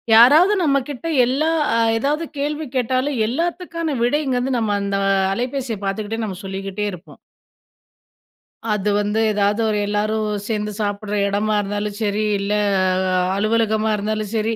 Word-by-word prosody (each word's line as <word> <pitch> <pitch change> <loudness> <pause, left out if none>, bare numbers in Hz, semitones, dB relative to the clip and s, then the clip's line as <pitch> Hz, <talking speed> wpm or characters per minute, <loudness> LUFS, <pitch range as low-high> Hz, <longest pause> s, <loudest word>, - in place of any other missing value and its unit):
யாராவது 300 - +7
நம்மக்கிட்ட 275 0 -1 0.2
எல்லா 280 +6 +1 0.3
அ - - +2 0.2
எதாவது 295 +7 -1
கேள்வி 300 +2 -2
கேட்டாலும் 255 +2 0
எல்லாத்துக்கான 335 +2 -2
விடைங்கிறது 265 -1 0
நம்ம 215 -3 0
அந்த 200 0 -2 0.4
அலைபேசிய 245 -1 -3
பார்த்துக்கிட்டே 215 +3 -3
நம்ம 190 -4 -5
சொல்லிக்கிட்டே 195 +1 -4
இருப்போம். 180 +1 -12 1.5
அது 210 0 -1
வந்து 210 +2 0
ஏதாவது 205 +2 +1
ஒரு 210 - 0
எல்லாரும் 215 +1 0 0.2
சேர்ந்து 210 -1 -2
சாப்பிடுற 205 0 -2
இடமா 210 +2 0
இருந்தாலும் 205 +1 -3
சரி, 210 +1 0 0.2
இல்ல 200 +1 -1 0.8
அலுவலகமா 220 +1 +1
இருந்தாலும் 215 0 -3
சரி, 220 +1 0
220 Hz, 125 wpm, -20 LUFS, 205-265 Hz, 1.5 s, யாராவது